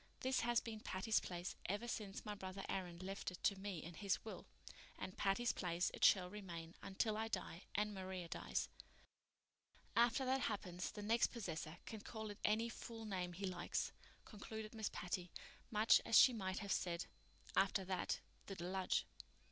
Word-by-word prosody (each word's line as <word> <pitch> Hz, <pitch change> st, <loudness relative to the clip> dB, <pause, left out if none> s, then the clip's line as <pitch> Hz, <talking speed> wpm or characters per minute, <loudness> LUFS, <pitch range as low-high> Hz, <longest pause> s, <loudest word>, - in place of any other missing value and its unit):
This 260 Hz, +1 st, +2 dB
has 240 Hz, 0 st, +4 dB
been 220 Hz, -2 st, -5 dB
Patty's 215 Hz, +2 st, +2 dB
Place 175 Hz, 0 st, -4 dB
ever 205 Hz, +5 st, 0 dB
since 205 Hz, -4 st, -3 dB
my 210 Hz, -, -2 dB
brother 195 Hz, -1 st, -5 dB
Aaron 180 Hz, -3 st, -2 dB
left 195 Hz, +2 st, -3 dB
it 180 Hz, -, -10 dB
to 200 Hz, -, +4 dB
me 195 Hz, -4 st, -3 dB
in 170 Hz, -, -7 dB
his 195 Hz, +5 st, 0 dB
will, 220 Hz, -, -6 dB, 0.5 s
and 185 Hz, -, -5 dB
Patty's 205 Hz, +4 st, +2 dB
Place 175 Hz, -1 st, +1 dB
it -, -, -5 dB
shall 185 Hz, -2 st, +7 dB
remain 175 Hz, -4 st, -6 dB
until 210 Hz, +3 st, 0 dB
I 220 Hz, +1 st, 0 dB
die 185 Hz, -5 st, -3 dB
and 210 Hz, 0 st, +2 dB
Maria 185 Hz, -2 st, -4 dB
dies. -, -, -1 dB, 1.3 s
After 235 Hz, +3 st, +5 dB
that 260 Hz, +1 st, +3 dB
happens 180 Hz, -5 st, -1 dB
the 210 Hz, -, -6 dB
next 230 Hz, +3 st, +4 dB
possessor 165 Hz, -8 st, -4 dB
can 220 Hz, -2 st, -6 dB
call 220 Hz, -1 st, -5 dB
it 205 Hz, -, -10 dB
any 220 Hz, +2 st, +3 dB
fool 225 Hz, 0 st, -6 dB
name 180 Hz, -4 st, -2 dB
he 195 Hz, +3 st, -3 dB
likes," 180 Hz, -2 st, -1 dB, 0.3 s
concluded 215 Hz, +1 st, -6 dB
Miss 220 Hz, -2 st, -1 dB
Patty, 180 Hz, 0 st, -2 dB, 0.4 s
much 215 Hz, +1 st, +6 dB
as 225 Hz, -, +6 dB
she 255 Hz, -, +10 dB
might 190 Hz, -4 st, -2 dB
have 200 Hz, -, -2 dB
said, 170 Hz, -1 st, 0 dB, 0.5 s
"After 195 Hz, 0 st, +3 dB
that—the 190 Hz, +1 st, -3 dB
deluge." 185 Hz, +1 st, +1 dB
195 Hz, 170 wpm, -41 LUFS, 180-220 Hz, 1.3 s, she